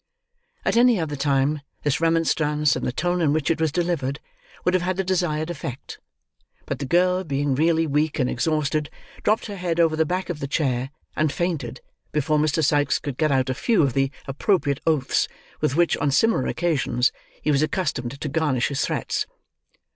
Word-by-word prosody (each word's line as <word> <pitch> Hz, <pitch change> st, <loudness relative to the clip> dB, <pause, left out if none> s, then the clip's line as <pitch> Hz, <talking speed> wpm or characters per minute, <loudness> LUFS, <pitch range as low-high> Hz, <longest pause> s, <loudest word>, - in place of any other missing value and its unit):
At -, -, +2 dB
any 240 Hz, -3 st, +5 dB
other 155 Hz, -3 st, -2 dB
time, 140 Hz, +1 st, +1 dB, 0.2 s
this 145 Hz, +1 st, 0 dB
remonstrance, 150 Hz, -3 st, +2 dB
and -, -, -2 dB
the -, -, 0 dB
tone 175 Hz, +6 st, 0 dB
in 150 Hz, -3 st, +3 dB
which 155 Hz, -1 st, +1 dB
it 160 Hz, -, -1 dB
was 160 Hz, -2 st, +2 dB
delivered, 165 Hz, -5 st, -1 dB, 0.5 s
would 180 Hz, -, +3 dB
have 185 Hz, -, +3 dB
had 185 Hz, +1 st, -1 dB
the 195 Hz, -, +1 dB
desired 175 Hz, -3 st, 0 dB
effect; 135 Hz, -5 st, -7 dB, 0.7 s
but -, -, -4 dB
the 140 Hz, -, -4 dB
girl 180 Hz, +4 st, +3 dB
being 140 Hz, -3 st, 0 dB
really 165 Hz, +3 st, +2 dB
weak 150 Hz, +1 st, 0 dB
and 125 Hz, -, +1 dB
exhausted, 150 Hz, +3 st, 0 dB, 0.3 s
dropped 215 Hz, +2 st, +1 dB
her 205 Hz, -2 st, -6 dB
head 175 Hz, -2 st, -2 dB
over 165 Hz, -2 st, +4 dB
the 160 Hz, -, +3 dB
back 185 Hz, +1 st, -2 dB
of 160 Hz, -, -6 dB
the 140 Hz, -, -3 dB
chair, 135 Hz, -3 st, 0 dB, 0.3 s
and 155 Hz, -1 st, +1 dB
fainted, 145 Hz, -9 st, -3 dB, 0.3 s
before 150 Hz, 0 st, +1 dB
Mr. 155 Hz, +1 st, +1 dB
Sikes 145 Hz, -2 st, +2 dB
could 140 Hz, -3 st, -5 dB
get 155 Hz, -2 st, +2 dB
out 130 Hz, -1 st, +2 dB
a -, -, 0 dB
few 195 Hz, -, +2 dB
of 135 Hz, -4 st, +1 dB
the 135 Hz, +1 st, +2 dB, 0.2 s
appropriate 140 Hz, 0 st, +1 dB
oaths 150 Hz, -5 st, +2 dB, 0.3 s
with 130 Hz, -, 0 dB
which, 170 Hz, +1 st, +3 dB
on 145 Hz, -, +1 dB
similar 225 Hz, +11 st, +2 dB
occasions, 135 Hz, -7 st, +1 dB, 0.3 s
he 150 Hz, -, +2 dB
was 140 Hz, -1 st, +3 dB
accustomed 140 Hz, -6 st, -2 dB
to 150 Hz, -, -3 dB
garnish 145 Hz, -4 st, +1 dB
his 140 Hz, -1 st, -1 dB
threats. -, -, -1 dB
155 Hz, 190 wpm, -23 LUFS, 140-170 Hz, 0.7 s, any